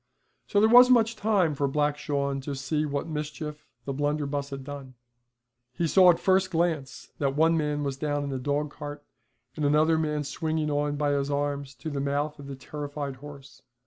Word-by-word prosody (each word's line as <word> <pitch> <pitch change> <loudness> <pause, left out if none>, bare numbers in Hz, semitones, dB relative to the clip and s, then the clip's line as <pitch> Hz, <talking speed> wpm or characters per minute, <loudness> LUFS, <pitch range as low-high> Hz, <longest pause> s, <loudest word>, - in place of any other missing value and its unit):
So 205 - +2
there 215 - +5
wasn't 250 +2 +8
much 230 0 +2
time 200 -7 +2
for 140 0 0
Black 145 +1 +1
Shawn 140 -2 -2
to 140 +1 -5
see 150 +3 -1
what 140 -1 -2
mischief 150 -1 -5 0.2
the 140 - -3
blunderbuss 145 0 -1
had 135 -1 -6
done. 135 -2 -9 0.8
He 170 - -1
saw 185 +2 +6
at 175 - +6
the - - -13
first 190 0 +3
glance 160 -6 -2
that 140 -1 0
one 165 +2 +4
man 150 -2 -1
was 140 -2 -3
down 145 0 -1
in 140 - -4
the 135 - -3
dogcart, 145 +1 -4 0.5
and 155 - -3
another 155 +2 +3
man 150 -1 -1
swinging 155 +1 -2
on 145 0 0
by 145 0 0
his 140 0 0
arms 140 -1 -2
to 160 - -6
the 140 -1 -2
mouth 145 +2 -2
of 140 - -9
the 140 - -6
terrified 145 0 -6
horse. 140 0 -12
145 Hz, 195 wpm, -27 LUFS, 140-155 Hz, 0.8 s, wasn't